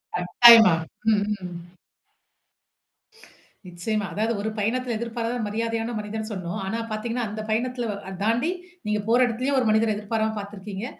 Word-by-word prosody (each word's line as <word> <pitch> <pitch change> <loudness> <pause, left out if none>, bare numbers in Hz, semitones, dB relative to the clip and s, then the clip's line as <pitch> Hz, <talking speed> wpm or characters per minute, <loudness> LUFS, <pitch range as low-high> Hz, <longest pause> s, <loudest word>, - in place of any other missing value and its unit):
கட்டாயமா! 220 +1 +8 0.4
ம், 210 - +4 0.3
ம். 175 -1 -6 2.1
நிச்சயமா. 200 +4 -3
அதாவது 220 +3 0
ஒரு 220 - -2
பயணத்தில 240 +3 -1
எதிர்பாராத 235 +1 -3
மரியாதையான 230 +2 -2
மனிதன்னு 215 +1 -5
சொன்னோம். 185 +2 -4
ஆனா 225 +4 -2
பாத்தீங்கன்னா, 235 +3 -2
அந்த 215 +1 -5
பயணத்தில 240 +2 -1
வ - - -1 0.2
அ - - -8
தாண்டி 240 +10 +1 0.4
நீங்க 210 0 0
போற 235 +2 +4
எடத்திலயும் 255 +4 -1
ஒரு 240 - +1
மனிதர 220 +1 +3
எதிர்பாராம 220 +1 -2
பாத்துருக்கீங்க. 200 +1 -7
220 Hz, 135 wpm, -24 LUFS, 210-235 Hz, 2.1 s, கட்டாயமா